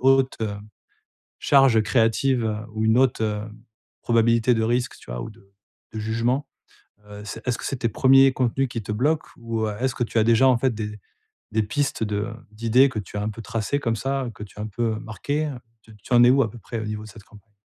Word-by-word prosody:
haute, 135 Hz, 0 st, +3 dB
heu, 105 Hz, -2 st, -2 dB, 0.9 s
charge 135 Hz, -6 st, +5 dB
créative, 120 Hz, +2 st, +2 dB
heu, 110 Hz, -1 st, -1 dB, 0.2 s
ou 110 Hz, 0 st, -1 dB
une 110 Hz, +2 st, +4 dB
haute, 130 Hz, -4 st, +2 dB
heu, 105 Hz, -1 st, -1 dB, 0.6 s
probabilité 115 Hz, +1 st, +3 dB
de 115 Hz, -, 0 dB
risque, 120 Hz, +2 st, -1 dB
tu -, -, -16 dB
vois, -, -, -4 dB
ou -, -, -6 dB
de 100 Hz, -3 st, -22 dB, 0.4 s
de 110 Hz, -, -4 dB
jugement. 115 Hz, +6 st, -1 dB, 0.6 s
Heu, 105 Hz, 0 st, -9 dB
c'est 115 Hz, +2 st, -8 dB
est-ce 125 Hz, -1 st, +1 dB
que -, -, -7 dB
c'est -, -, -2 dB
tes 115 Hz, -1 st, -1 dB
1ers 135 Hz, +4 st, +5 dB
contenus 130 Hz, +1 st, 0 dB
qui 115 Hz, -1 st, -4 dB
te 105 Hz, -, -5 dB
bloquent, 150 Hz, +8 st, 0 dB
ou, 115 Hz, -1 st, -2 dB
heu, 105 Hz, -, -4 dB
est-ce 130 Hz, -1 st, 0 dB
que 120 Hz, -, -1 dB
tu 115 Hz, -, -4 dB
as -, -, +4 dB
déjà, 115 Hz, +3 st, +5 dB
en 130 Hz, -2 st, +4 dB
fait, 130 Hz, +1 st, +1 dB
des 105 Hz, -1 st, -5 dB, 0.6 s
des 110 Hz, 0 st, +2 dB
pistes 115 Hz, +5 st, -2 dB
de 105 Hz, -1 st, -2 dB, 0.3 s
d'idées 115 Hz, +5 st, +4 dB
que 115 Hz, -, -5 dB
tu 105 Hz, 0 st, -7 dB
as 105 Hz, -, -2 dB
un 105 Hz, -, -1 dB
peu 110 Hz, -, -9 dB
tracées, 115 Hz, +6 st, -2 dB
comme 115 Hz, -3 st, -1 dB
ça, 135 Hz, +3 st, -2 dB
heu, 120 Hz, -, -5 dB
que 105 Hz, -, -12 dB
tu 100 Hz, -, -16 dB
as 105 Hz, -, -4 dB
un -, -, -3 dB
peu, 115 Hz, +2 st, -1 dB
heu, -, -, -7 dB
marquées, 140 Hz, +7 st, -3 dB
heu? 140 Hz, -4 st, -5 dB, 0.2 s
Tu 110 Hz, -1 st, -17 dB
tu -, -, -8 dB
en 120 Hz, -, +7 dB
es 125 Hz, -, +7 dB
où 135 Hz, +1 st, +5 dB
à 110 Hz, -, -1 dB
peu 120 Hz, -, -11 dB
près 115 Hz, 0 st, -6 dB
au -, -, -4 dB
niveau 105 Hz, 0 st, -5 dB
de -, -, -11 dB
cette 105 Hz, -1 st, -14 dB
campagne? 105 Hz, 0 st, -19 dB
115 Hz, 250 wpm, -24 LUFS, 110-130 Hz, 0.9 s, en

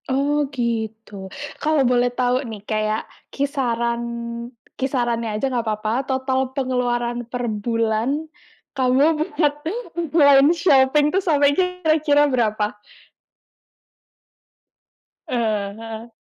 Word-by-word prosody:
Oh, 285 Hz, +2 st, +1 dB
gitu. 220 Hz, -6 st, -4 dB, 0.3 s
Kalau 310 Hz, -1 st, +2 dB
boleh 245 Hz, 0 st, +3 dB
tahu 250 Hz, +1 st, 0 dB
nih 215 Hz, -2 st, -7 dB
kayak 215 Hz, 0 st, -1 dB, 0.3 s
kisaran 235 Hz, -4 st, -1 dB, 0.7 s
kisarannya 240 Hz, -4 st, -1 dB
aja 245 Hz, -, -1 dB
nggak 240 Hz, -2 st, -1 dB
apa-apa. 215 Hz, 0 st, -1 dB, 0.2 s
Total 260 Hz, 0 st, 0 dB, 0.2 s
pengeluaran 245 Hz, -2 st, 0 dB
per 245 Hz, -1 st, -3 dB
bulan 230 Hz, +6 st, -1 dB, 0.5 s
kamu 260 Hz, +1 st, +2 dB, 0.3 s
buat 295 Hz, -2 st, +2 dB, 0.6 s
online 285 Hz, -1 st, +7 dB
shopping 290 Hz, -3 st, +4 dB
itu 385 Hz, -, +3 dB
sampai 290 Hz, -6 st, +3 dB
kira-kira 315 Hz, -4 st, +2 dB
berapa? 215 Hz, -4 st, 0 dB, 2.5 s
Eee, 215 Hz, -4 st, -1 dB
heeh. 225 Hz, +1 st, -8 dB
245 Hz, 95 wpm, -21 LUFS, 225-280 Hz, 2.5 s, online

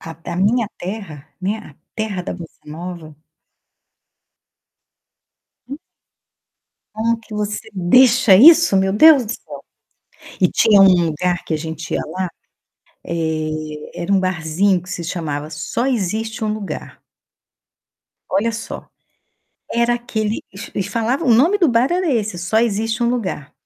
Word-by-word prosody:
A 165 Hz, -, -9 dB, 0.2 s
a -, -, -4 dB
minha 215 Hz, +4 st, +1 dB
terra, 175 Hz, -6 st, -7 dB
né, 200 Hz, +4 st, -2 dB
a 155 Hz, -10 st, -14 dB, 0.2 s
terra 215 Hz, -5 st, -3 dB
da -, -, -5 dB
bossa 170 Hz, -3 st, -11 dB
nova 160 Hz, 0 st, -8 dB, 2.5 s
Hum. 275 Hz, +3 st, -7 dB, 1.2 s
Como 230 Hz, +1 st, 0 dB
que 220 Hz, -1 st, -13 dB
você 210 Hz, +1 st, -3 dB
deixa 230 Hz, +3 st, +5 dB
isso, 315 Hz, -, +7 dB
meu 190 Hz, 0 st, +1 dB
Deus 280 Hz, +3 st, +7 dB
do 215 Hz, -, -5 dB
céu, -, -, -10 dB, 0.8 s
e 180 Hz, -, +4 dB
tinha 210 Hz, -3 st, +4 dB
um 180 Hz, -3 st, +5 dB
lugar 175 Hz, +3 st, -1 dB
que -, -, -3 dB
a -, -, 0 dB
gente 160 Hz, 0 st, -6 dB
ia -, -, 0 dB
lá, 185 Hz, 0 st, -3 dB, 0.8 s
eh, 155 Hz, -1 st, -4 dB
era 175 Hz, -, -1 dB
um 195 Hz, -, +4 dB
barzinho 185 Hz, +1 st, 0 dB
que 180 Hz, -, -12 dB
se 175 Hz, -, -4 dB
chamava 155 Hz, -3 st, -4 dB
Só 155 Hz, +10 st, -3 dB
Existe 220 Hz, -2 st, -2 dB
Um 215 Hz, -, 0 dB
Lugar. 215 Hz, -2 st, -7 dB, 1.3 s
Olha 230 Hz, +4 st, +1 dB
só, 225 Hz, 0 st, -7 dB, 0.8 s
era 235 Hz, +1 st, +2 dB
aquele 225 Hz, -3 st, -3 dB
eles 200 Hz, +4 st, -9 dB
eles 195 Hz, -, -2 dB
falavam 235 Hz, +8 st, -1 dB
o 235 Hz, -, +6 dB
nome 325 Hz, -, +4 dB
do 345 Hz, -5 st, +4 dB
bar 240 Hz, +2 st, +2 dB
era 360 Hz, -2 st, 0 dB
esse: 215 Hz, -7 st, -1 dB
Só 185 Hz, +5 st, 0 dB
Existe 225 Hz, 0 st, 0 dB
Um 235 Hz, -, +2 dB
Lugar. 185 Hz, -, -4 dB
200 Hz, 145 wpm, -19 LUFS, 175-230 Hz, 2.5 s, isso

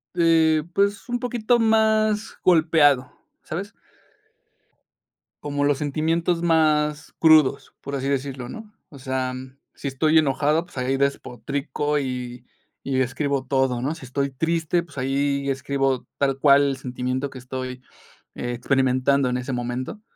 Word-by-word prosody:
eh, 160 Hz, -2 st, +3 dB
pues 200 Hz, +4 st, 0 dB
un 245 Hz, 0 st, -1 dB
poquito 240 Hz, -1 st, +1 dB
más 220 Hz, -1 st, +2 dB
golpeado, 155 Hz, -6 st, +4 dB, 0.3 s
¿sabes? 195 Hz, +7 st, -6 dB, 1.7 s
Como 145 Hz, -1 st, -2 dB
los 145 Hz, -1 st, +2 dB
sentimientos 165 Hz, +4 st, 0 dB
más 155 Hz, -2 st, +1 dB
crudos, 155 Hz, -4 st, +4 dB
por 140 Hz, 0 st, -6 dB
así 135 Hz, 0 st, -2 dB
decirlo, 135 Hz, -2 st, -3 dB
¿no? 220 Hz, -1 st, -10 dB, 0.2 s
O 140 Hz, -, -13 dB
sea, 130 Hz, -1 st, -2 dB, 0.4 s
sí, 140 Hz, -, -5 dB
estoy 155 Hz, +4 st, +3 dB
enojado, 150 Hz, +3 st, +1 dB
pues, 175 Hz, -, -19 dB
ahí 130 Hz, +1 st, 0 dB
despotrico 140 Hz, +2 st, -2 dB
y 125 Hz, -2 st, -5 dB, 0.4 s
y 130 Hz, -1 st, 0 dB
describo 130 Hz, +1 st, -1 dB
todo, 130 Hz, -2 st, +1 dB
¿no? 145 Hz, +5 st, -2 dB
Si 160 Hz, -, -12 dB
estoy 140 Hz, +2 st, -2 dB
triste, 165 Hz, +4 st, 0 dB
pues 150 Hz, -5 st, -13 dB
ahí 140 Hz, +1 st, 0 dB
escribo 135 Hz, -1 st, -1 dB
tal 135 Hz, -1 st, +1 dB
cual 140 Hz, 0 st, +5 dB
el 135 Hz, -, -2 dB
sentimiento 130 Hz, +1 st, -3 dB
que 130 Hz, -, -10 dB
estoy 130 Hz, 0 st, -6 dB, 0.5 s
experimentando 130 Hz, +2 st, +1 dB
en 125 Hz, -, -1 dB
ese 125 Hz, +1 st, -4 dB
momento. 125 Hz, -, -4 dB
140 Hz, 135 wpm, -23 LUFS, 130-160 Hz, 1.7 s, cual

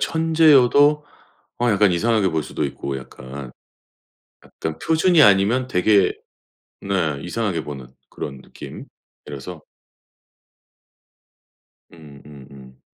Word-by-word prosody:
천재여도 150 Hz, -3 st, +3 dB, 0.6 s
어 120 Hz, -, +2 dB
약간 100 Hz, -2 st, +3 dB
이상하게 110 Hz, +1 st, +1 dB
볼 80 Hz, -2 st, -2 dB
수도 -, -, -4 dB
있고 70 Hz, 0 st, -5 dB
약간. 65 Hz, 0 st, -10 dB, 0.9 s
약간 -, -, -7 dB
표준이 160 Hz, 0 st, +3 dB
아니면 105 Hz, +4 st, +3 dB
되게 100 Hz, -1 st, +3 dB, 0.7 s
네 90 Hz, -7 st, -1 dB
이상하게 90 Hz, -2 st, -3 dB
보는 70 Hz, -4 st, -8 dB, 0.2 s
그런 70 Hz, -2 st, -7 dB
느낌이라서. 75 Hz, +3 st, -12 dB, 2.3 s
음음음. 70 Hz, -4 st, -15 dB
90 Hz, 210 characters per minute, -21 LUFS, -, 2.3 s, 천재여도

